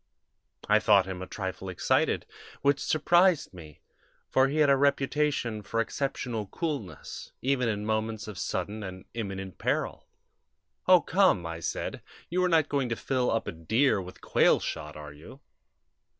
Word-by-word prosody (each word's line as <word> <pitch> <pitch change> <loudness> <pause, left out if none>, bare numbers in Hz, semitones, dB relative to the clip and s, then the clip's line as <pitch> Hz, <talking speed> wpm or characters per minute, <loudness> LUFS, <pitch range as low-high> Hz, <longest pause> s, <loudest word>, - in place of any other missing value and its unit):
I 105 +1 +5
thought 100 -1 +5
him 95 -1 -6
a 95 - -6
trifle 95 -1 -5
excited, 90 - +1 0.4
which 140 0 +3
surprised 175 - +3
me, 80 -4 -12 0.5
for 130 0 +4
he 145 +3 -2
had 150 -2 +5
a - - +6
reputation 140 -4 +1
for 115 +3 -3
exceptional 115 -3 -2
coolness, 115 - -5
even 130 -2 +1
in 105 -1 -2
moments 110 0 -2
of 105 -3 -7
sudden 100 +3 -3
and 95 -2 -8
imminent 95 -5 -5
peril. - - -1 0.8
"'O, 180 -2 +7
come!' 185 - +3
I 85 0 -5
said. 80 - -4 0.3
'You 180 +1 +1
are 180 - +3
not 160 -3 +4
going 140 -4 0
to 115 - -1
fill 130 0 0
up 115 - 0
a - - -2
deer 100 - +1
with 90 0 -11
quail - - +4
shot, 75 +1 -5
are 75 -1 -9
you?' 80 - -13
110 Hz, 160 wpm, -28 LUFS, 95-140 Hz, 0.8 s, O